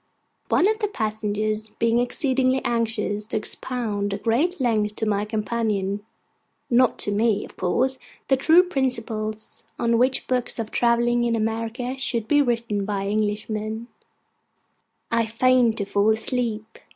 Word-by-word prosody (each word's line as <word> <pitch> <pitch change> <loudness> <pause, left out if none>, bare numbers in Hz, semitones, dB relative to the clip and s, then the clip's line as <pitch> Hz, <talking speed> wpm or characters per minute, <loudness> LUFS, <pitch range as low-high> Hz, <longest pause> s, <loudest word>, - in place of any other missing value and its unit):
One 360 - +4
of 435 +1 +1
the 420 - 0
passengers 215 - -2
being 230 +2 +1
exceedingly 260 0 +1
anxious 220 -3 -1
to - - 0
expound 210 -3 -1
at 200 - -10
great 290 +11 +1
length 215 -4 +1
to 220 - -1
my 205 -1 0
companion 210 -2 -2 0.7
(not 245 0 +4
to 205 - 0
me, 215 0 +1
of - - -15
course) 260 +9 0 0.3
the 270 - +4
true 320 +7 +5
principles 225 -9 -2
on 235 -1 +2
which 255 +2 +2
books 250 -1 0
of 225 -2 -4
travel 235 0 +2
in 240 -1 +2
America 230 +4 -2
should 235 -4 -1
be 290 +4 +4
written 235 -5 0
by 195 -1 -2
Englishmen, 215 +2 -2 1.2
I 230 -1 +2
feigned 240 0 +3
to 200 - -2
fall 200 +1 +2
asleep. 225 -1 -2
230 Hz, 140 wpm, -24 LUFS, 215-250 Hz, 1.2 s, true